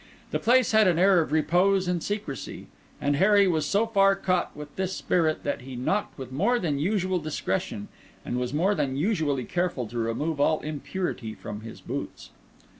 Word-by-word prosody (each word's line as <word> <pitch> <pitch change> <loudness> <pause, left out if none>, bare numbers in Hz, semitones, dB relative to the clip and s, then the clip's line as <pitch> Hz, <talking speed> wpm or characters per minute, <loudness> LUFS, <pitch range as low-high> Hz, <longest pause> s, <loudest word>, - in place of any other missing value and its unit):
The - - 0
place 250 +1 +4
had 215 -2 +5
an 175 -3 +3
air 185 0 +5
of 155 - -4
repose 180 +4 +3
and 180 -2 0
secrecy; 205 -9 -5 0.3
and 145 0 +1
Harry 200 +3 +5
was 160 -4 +1
so 205 +3 +2
far 195 -3 +4
caught 185 -5 -1
with 150 0 -9
this 190 0 -2
spirit 160 -3 0
that 145 - -2
he 130 0 -8
knocked 195 +12 -1
with 130 -2 -7
more 205 - +2
than 155 -10 -1
usual 185 +2 0
discretion, 190 +7 -3 0.4
and 125 - -2
was 125 0 -2
more 175 +8 +2
than 135 -8 -1
usually 150 - 0
careful 175 -8 -1
to 120 +1 -4
remove 140 +7 -1
all 155 +2 +3
impurity 150 - -4
from 105 -1 -7
his 115 0 -10
boots. - - -6
175 Hz, 185 wpm, -26 LUFS, 140-195 Hz, 0.4 s, had